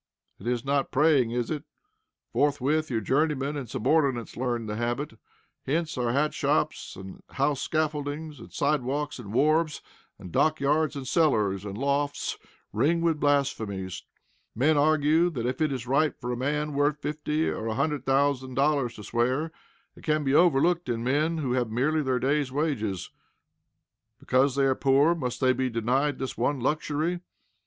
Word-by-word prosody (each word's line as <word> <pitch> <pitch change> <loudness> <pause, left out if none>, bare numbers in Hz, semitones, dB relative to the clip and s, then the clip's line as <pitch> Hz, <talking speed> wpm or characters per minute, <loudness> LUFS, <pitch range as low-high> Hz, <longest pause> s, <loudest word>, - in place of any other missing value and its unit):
It - - -8
is 125 +1 -1
not 140 0 +1
praying, 140 -4 +3
is 120 +3 -2
it? 150 -2 -3 0.7
Forthwith, 145 +2 +1
your 115 -3 -1
journeymen 145 +4 0
and 135 -6 -5
subordinates 135 -3 +1
learn 120 -2 -2
the 105 -1 -4
habit. 120 +4 -2 0.5
Hence 160 +3 -1
our 120 -2 0
hat 150 +4 +1
shops, - - -1
and 95 0 -10
house 140 +1 0
scaffoldings, 155 -1 -2
and - - -12
side 145 0 +1
walks, 145 +3 -3
and 105 -5 -8
wharves, 155 +5 +2 0.3
and 90 - -10
dockyards, 155 - +2
and 135 -2 -6
cellars, 105 - +2
and 100 0 -5
lofts 140 +2 -1 0.3
ring 165 +3 +2
with 165 -2 +1
blasphemies. 110 -11 0 0.5
Men 145 +7 +3
argue 155 +3 +3
that, 125 -8 -4
if 130 +4 -2
it 155 -2 +2
is 130 -3 -4
right 140 +4 +1
for 125 -1 -4
a - - -1
man 150 +4 -1
worth 145 +1 +1
fifty 150 +1 -2
or 110 - -3
a 110 - -2
hundred 145 +3 -1
thousand 135 -1 +1
dollars 140 -4 +1
to 105 - -10
swear, 130 +9 0 0.4
it - - -16
can 155 -1 +1
be 135 -1 +1
overlooked 170 0 +3
in 115 -1 -1
men 150 +6 +1
who 140 -5 -2
have 125 -3 0
merely 140 +8 +1
their 130 -3 0
day's 140 +1 0
wages. 125 - -2 1.1
Because 130 +1 +2
they 140 -1 +3
are 135 - +3
poor 140 +5 +3
must 125 -7 -4
they 130 -1 +4
be 130 +1 -1
denied 125 +5 0
this 130 0 -4
one 135 +4 0
luxury? 155 +5 -1
140 Hz, 165 wpm, -27 LUFS, 125-150 Hz, 1.1 s, they